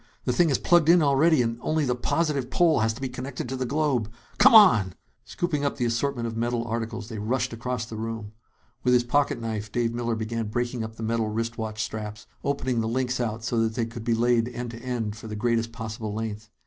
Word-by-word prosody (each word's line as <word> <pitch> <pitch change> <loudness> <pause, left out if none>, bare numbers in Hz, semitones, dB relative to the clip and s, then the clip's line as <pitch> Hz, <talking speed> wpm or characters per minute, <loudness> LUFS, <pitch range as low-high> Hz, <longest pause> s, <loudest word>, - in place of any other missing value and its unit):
The - - +1
thing 175 -3 +3
is 135 - +3
plugged 175 -3 +4
in 170 -1 +6
already 145 0 +4
and 115 0 -2
only 155 -1 0
the 125 - +1
positive 140 +1 0
pole 165 0 +3
has 110 0 +2
to 115 - -11
be 135 - -1
connected 125 +1 -5
to 130 - -2
the 130 -1 -2
globe. 135 -6 0 0.3
Come - - +8
on!" 115 - +7 0.3
Scooping 160 -5 -2
up 140 - -1
the 125 - 0
assortment 120 +1 -1
of 115 -1 -4
metal 120 +1 -1
articles, 115 -1 -4
they 110 -3 -6
rushed 120 +4 -1
across 125 0 -3
the 110 -1 -8
room. 110 -1 -5 0.5
With 125 0 +4
his 120 - +4
pocket 140 +4 +1
knife, 110 -2 -4
Dave 115 0 0
Miller 120 -1 -1
began 110 0 -3
breaking 120 +2 -2
up 110 0 -7
the 115 - -7
metal 115 -1 0
wrist 115 +2 -3
watch 110 -1 -3
straps, 105 -1 -6 0.2
opening 130 -4 0
the 110 - -1
links 125 +2 -1
out 115 -2 -2
so 120 0 0
that 110 -1 0
they 120 -2 0
could 115 0 -8
be 115 0 +1
laid 120 0 +2
end 120 -1 -5
to 115 - -9
end 115 -4 -3
for 110 - -9
the 105 - -5
greatest 115 +1 0
possible 110 -2 -5
length. 110 -1 -5
115 Hz, 230 wpm, -26 LUFS, 110-130 Hz, 0.5 s, Come